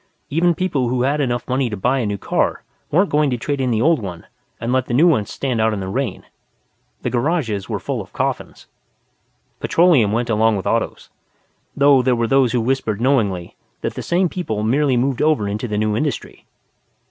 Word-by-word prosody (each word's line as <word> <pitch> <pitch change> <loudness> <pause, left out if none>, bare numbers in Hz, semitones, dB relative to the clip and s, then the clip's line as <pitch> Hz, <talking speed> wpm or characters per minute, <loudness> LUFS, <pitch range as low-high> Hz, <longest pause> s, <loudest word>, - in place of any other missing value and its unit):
Even 170 +3 +2
people 145 -9 0
who 125 0 0
had 145 +3 +1
enough 120 -3 -2
money 130 -1 0
to 105 - -4
buy 125 +8 +1
a 115 - -1
new 105 0 -2
car - - -1 0.3
weren't 185 +6 +2
going 150 -1 +3
to 125 - -1
trade 140 +3 -2
in 130 - 0
the 115 -1 +1
old 165 0 +3
one 90 -4 -7 0.3
and 115 +2 -2
let 130 -1 +1
the 120 - -1
new 150 +7 +5
one 110 - +2
stand 125 -5 -2
out 110 0 +2
in - - -4
the 95 - -4
rain. 125 +6 -3 0.8
The - - -1
garages 120 - -1
were - - -1
full - - -3
of - - -12
coffins. - - -3 0.9
Petroleum 160 - +3
went 115 +2 -1
along 110 0 +3
with 95 - -5
Autos. - - -2 0.7
(Though 140 -1 +5
there 125 0 +2
were 115 0 0
those 130 0 +3
who 125 - +1
whispered 115 -4 -1
knowingly 105 -9 0 0.3
that - - -2
the - - -5
same 180 +2 +1
people 110 - -3
merely 130 +3 +2
moved 130 +1 0
over 150 -9 +2
into 105 +4 -3
the 105 -2 -2
new 105 0 0
industry. 145 +5 -3
125 Hz, 205 wpm, -20 LUFS, 110-140 Hz, 0.9 s, new